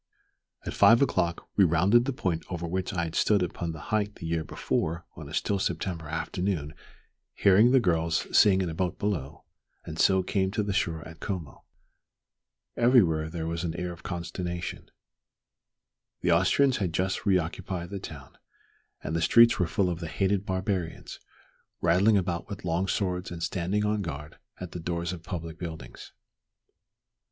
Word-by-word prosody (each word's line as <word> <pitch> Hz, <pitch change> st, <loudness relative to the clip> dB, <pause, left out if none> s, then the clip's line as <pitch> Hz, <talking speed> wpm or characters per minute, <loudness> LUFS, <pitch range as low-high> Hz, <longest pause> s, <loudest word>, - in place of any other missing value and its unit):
At -, -, -4 dB
five 115 Hz, +1 st, +6 dB
o'clock 85 Hz, -10 st, -1 dB
we 100 Hz, -, +7 dB
rounded 95 Hz, +8 st, +4 dB
the 140 Hz, -, 0 dB
point 90 Hz, -10 st, -2 dB
over 85 Hz, -2 st, -4 dB
which 95 Hz, +2 st, -2 dB
I 90 Hz, -4 st, -1 dB
had 80 Hz, -1 st, -4 dB
stood 100 Hz, -3 st, +3 dB
upon 85 Hz, -1 st, -3 dB
the 80 Hz, -, -8 dB
height 105 Hz, -1 st, 0 dB
the -, -, -9 dB
year 80 Hz, -1 st, -1 dB
before 85 Hz, +2 st, -2 dB
on -, -, -9 dB
a -, -, -10 dB
still 100 Hz, -1 st, 0 dB
September 85 Hz, -3 st, -2 dB
afternoon 80 Hz, 0 st, -2 dB, 0.6 s
hearing 105 Hz, +4 st, +5 dB
the 130 Hz, +1 st, +5 dB
girls 85 Hz, -6 st, +1 dB
sing 95 Hz, -2 st, +6 dB
in 90 Hz, -, -2 dB
a -, -, -5 dB
boat 90 Hz, +1 st, -2 dB
below, 80 Hz, -9 st, -3 dB, 0.4 s
and 80 Hz, +1 st, -7 dB
so 95 Hz, -1 st, +4 dB
came 95 Hz, 0 st, 0 dB
to 105 Hz, -, 0 dB
the 100 Hz, -1 st, -2 dB
shore 80 Hz, -4 st, -1 dB
at 80 Hz, 0 st, -12 dB
Como. 90 Hz, -8 st, -6 dB, 1.1 s
Everywhere 90 Hz, -11 st, +4 dB
there 80 Hz, -1 st, -4 dB
was 85 Hz, +1 st, -3 dB
an 85 Hz, -1 st, -3 dB
air 90 Hz, 0 st, -3 dB
of 85 Hz, -, -14 dB
consternation. 85 Hz, 0 st, -5 dB, 1.3 s
The 90 Hz, -, +2 dB
Austrians 125 Hz, +11 st, +3 dB
had 90 Hz, -5 st, -2 dB
just 95 Hz, +4 st, -1 dB
re 95 Hz, -2 st, +5 dB
occupied 90 Hz, +1 st, -4 dB
the 100 Hz, -, -4 dB
town, -, -, -10 dB, 0.6 s
and 80 Hz, -, -3 dB
the 85 Hz, -, 0 dB
streets 115 Hz, +7 st, +6 dB
were 90 Hz, -, +2 dB
full 95 Hz, +3 st, +1 dB
of 85 Hz, -2 st, -2 dB
the 85 Hz, -, -5 dB
"hated 95 Hz, +4 st, 0 dB
barbarians," 95 Hz, -3 st, -3 dB, 0.6 s
rattling 95 Hz, +6 st, +4 dB
about 85 Hz, -1 st, -2 dB
with 100 Hz, -2 st, -7 dB
long 85 Hz, +3 st, 0 dB
swords 90 Hz, -2 st, -1 dB
and 85 Hz, -1 st, -6 dB
standing 95 Hz, +5 st, -1 dB
on 105 Hz, 0 st, 0 dB
guard 75 Hz, -4 st, -7 dB, 0.2 s
at 90 Hz, -2 st, -7 dB
the 90 Hz, -, -6 dB
doors 85 Hz, +1 st, -3 dB
of 85 Hz, -, -8 dB
public 85 Hz, -2 st, -6 dB
buildings. 80 Hz, -7 st, -8 dB
90 Hz, 170 wpm, -28 LUFS, 85-100 Hz, 1.3 s, we